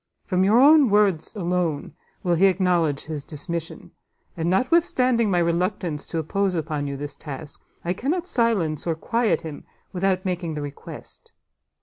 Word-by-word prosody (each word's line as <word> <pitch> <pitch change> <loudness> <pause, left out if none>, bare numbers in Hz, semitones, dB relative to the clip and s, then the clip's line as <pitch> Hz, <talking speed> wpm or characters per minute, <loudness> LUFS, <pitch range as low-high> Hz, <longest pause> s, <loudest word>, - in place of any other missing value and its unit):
From 185 -1 +1
your 210 +5 +5
own 290 -1 +7
words 200 -4 +2
alone 175 -7 -1 0.3
will 175 - +2
he 185 +4 +5
acknowledge 175 -6 +1
his 155 -3 -5
dismission; 165 +2 -6 0.4
and 165 0 -1
notwithstanding 250 - +2
my 180 - +2
reluctance 170 -2 -1
to 165 - -4
impose 190 +4 0
upon 155 -3 -2
you 140 0 -4
this 145 +1 -6
task, 145 -1 -8 0.2
I 175 - +1
cannot 315 - -2
silence 205 - 0
or 165 - +1
quiet 230 +5 0
him 160 -3 -8 0.3
without 185 0 0
making 175 -3 -2
the 150 - -3
request. 145 -1 -10
180 Hz, 150 wpm, -24 LUFS, 160-205 Hz, 0.4 s, own